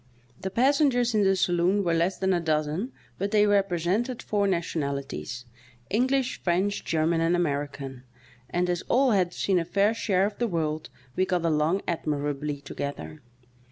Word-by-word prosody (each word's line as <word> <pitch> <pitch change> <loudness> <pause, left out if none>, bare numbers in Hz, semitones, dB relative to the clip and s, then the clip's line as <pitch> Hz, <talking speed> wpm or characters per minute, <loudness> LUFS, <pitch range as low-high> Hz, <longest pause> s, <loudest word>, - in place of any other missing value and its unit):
The 190 - -2
pas 265 +8 +3
sengers 245 -5 +3
in 215 - +3
the 195 -1 +4
saloon 180 +2 +2
were 170 -2 +1
less 170 +3 +1
than 190 0 +1
a 175 - +2
dozen, 160 - -1 0.3
but 200 +2 -1
they 210 0 +4
represented 200 +4 +1
foar 205 -1 +1
nationalities 140 - -3 0.2
— 120 -1 -27
English, 260 +4 +1
French, 190 +3 0
German 165 +1 +1
and 165 +1 +2
American 140 -5 -2 0.3
— - - -26
and 180 +1 0
as 175 -1 -1
all 260 0 +4
had 185 -4 +2
seen 185 0 +1
a - - 0
fair 200 +5 +2
share 200 -4 +1
of 205 0 -4
the 240 - +1
world 155 -4 -2 0.3
we 185 - +2
got 180 -2 0
along 160 +4 +2
admi 150 -3 -2
rably 145 0 -5
together. 145 +2 -6
175 Hz, 175 wpm, -26 LUFS, 155-205 Hz, 0.3 s, the